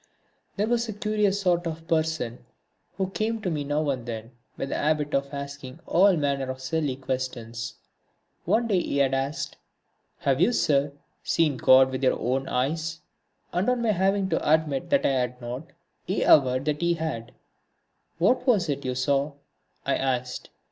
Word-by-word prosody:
There 205 - +1
was 235 0 0
a - - -3
curious 210 -2 +1
sort 175 -2 +1
of 165 0 -6
person 160 -8 -1 0.5
who 190 -1 -1
came 220 +3 -1
to 180 - 0
me 150 -2 -1
now 145 +2 -1
and 125 -3 -5
then, 115 0 -6 0.3
with 135 - -4
a - - -1
habit 150 -1 0
of 140 0 0
asking 140 -2 -7
all 190 +2 +5
manner 140 -3 0
of 130 0 -4
silly 135 +1 -1
questions. 125 -4 -4 0.7
One 235 +2 +2
day 195 -5 +2
he 140 - -2
had 135 -1 +3
asked: 135 +4 -2 0.6
"Have 135 +1 +1
you, 200 +7 +4
sir, 140 -7 +2 0.3
seen 160 -4 +1
God 130 +1 +6
with 130 +1 -4
your 130 - +2
own 130 +3 -1
eyes?" 160 +6 -1 0.5
And 180 +6 +1
on 250 -1 +1
my 225 - +3
having 195 0 +1
to 150 - +1
admit 150 -4 0
that 280 -1 +3
I - - +4
had 125 -1 -1
not, 125 +5 -6 0.4
he 190 - -1
averred 130 -2 +5
that 150 0 -1
he 170 0 +2
had. 155 -8 -4 0.9
"What 225 +10 +2
was 200 -10 +3
it 140 -1 -2
you 125 -1 -2
saw?" 140 +3 +1 0.5
I - - +1
asked. 125 -1 -2
145 Hz, 175 wpm, -26 LUFS, 130-175 Hz, 0.9 s, God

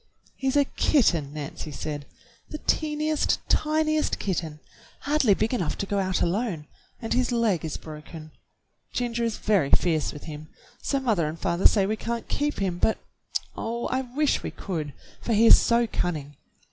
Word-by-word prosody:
"He's 270 0 -1
a 285 - +5
kitten," 175 - +2
Nancy 150 +1 -6
said. 145 +1 -5 0.4
"The 305 - -5
teentiest, 305 0 +1
tiniest 310 0 +1
kitten, 165 -5 -3 0.4
hardly 280 -8 +3
big 220 +5 0
enough 175 -11 -1
to - - -2
go 200 0 -1
out 185 -1 0
alone, 175 -4 -1 0.3
and 225 - -2
his 250 +1 +1
leg 225 -8 +1
is 160 - -3
broken. 155 0 -10 0.6
Ginger 235 -1 -1
is 230 -2 -1
very 195 -10 +2
fierce 160 -2 +2
with 150 - -10
him, 155 0 -8 0.3
so 275 - 0
mother 215 - +1
and 155 +2 -5
father 170 +3 +4
say 200 -3 +2
we 215 +2 -1
can't 235 +1 -4
keep 295 +1 -1
him, 185 -3 -1
but, 220 - +2 0.6
oh, 235 +1 -3
I 260 - 0
wish 270 +4 0
we - - -4
could, 155 -7 -5 0.3
for 235 - -1
he 220 +2 +5
is - - +9
so 235 0 +3
cunning! 150 -9 -3
210 Hz, 170 wpm, -26 LUFS, 160-250 Hz, 0.6 s, is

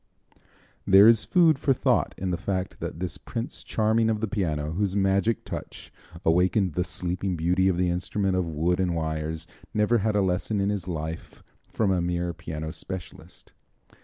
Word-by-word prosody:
There 95 +2 +8
is 115 -1 +5
food 165 -5 +4
for 140 - +3
thought - - +1
in 95 0 -2
the - - +1
fact 95 +1 -3
that - - -5
this 90 0 -4
Prince 115 +4 -5
Charming 110 +1 +1
of 110 -1 0
the 110 - -1
piano, 80 -8 -2
whose 95 +3 -1
magic 100 +3 +1
touch - - -8 0.3
awakened 90 +2 +2
the 90 - 0
Sleeping 90 +1 -3
Beauty 90 +3 +2
of 95 -2 +2
the 90 -1 +1
instrument 95 +2 -1
of 90 -2 0
wood 85 +3 0
and 90 -2 0
wires, 80 0 -3 0.3
never 105 +3 +3
had 110 +1 0
a 100 - +3
lesson 95 +3 0
in 100 +1 +1
his 100 -4 -3
life 80 -2 -6 0.3
from 105 -4 +1
a 90 -2 +1
mere 85 0 -1
piano 80 -2 -6
specialist. 90 +2 -9
95 Hz, 175 wpm, -26 LUFS, 85-105 Hz, 0.3 s, There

